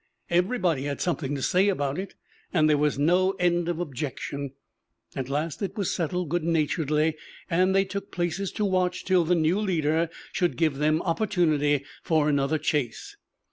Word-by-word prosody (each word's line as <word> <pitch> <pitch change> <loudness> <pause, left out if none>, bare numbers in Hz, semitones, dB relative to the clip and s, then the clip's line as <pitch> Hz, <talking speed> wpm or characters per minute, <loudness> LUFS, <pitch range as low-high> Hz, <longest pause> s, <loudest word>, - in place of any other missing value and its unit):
Everybody 175 - +1
had 140 -1 -3
something 150 -5 -1
to 135 - -4
say 185 +3 +3
about 145 -4 -1
it; 195 - -6 0.4
and 155 -4 +3
there 150 -1 +3
was 150 -1 +1
no 180 +6 +3
end 175 -2 +1
of 170 -1 -2
objection. 140 -2 -4 0.6
At 130 -1 -4
last 150 +5 -2
it 200 +2 -3
was 200 -4 0
settled 180 -1 -2
good 175 +1 0
naturedly, 155 -1 +1 0.4
and 185 +3 +3
they 195 0 +4
took 200 +1 -5
places 175 +2 -2
to 210 - 0
watch 185 -2 0
till 185 -2 +4
the 175 +2 +3
new 165 +4 +2
leader 165 -5 +1 0.2
should 175 -2 0
give 155 -4 +1
them 155 +2 +2
opportunity 155 -6 +1 0.2
for 155 -2 +2
another 140 +1 +1
chase. 145 -6 -2
165 Hz, 170 wpm, -26 LUFS, 150-180 Hz, 0.6 s, they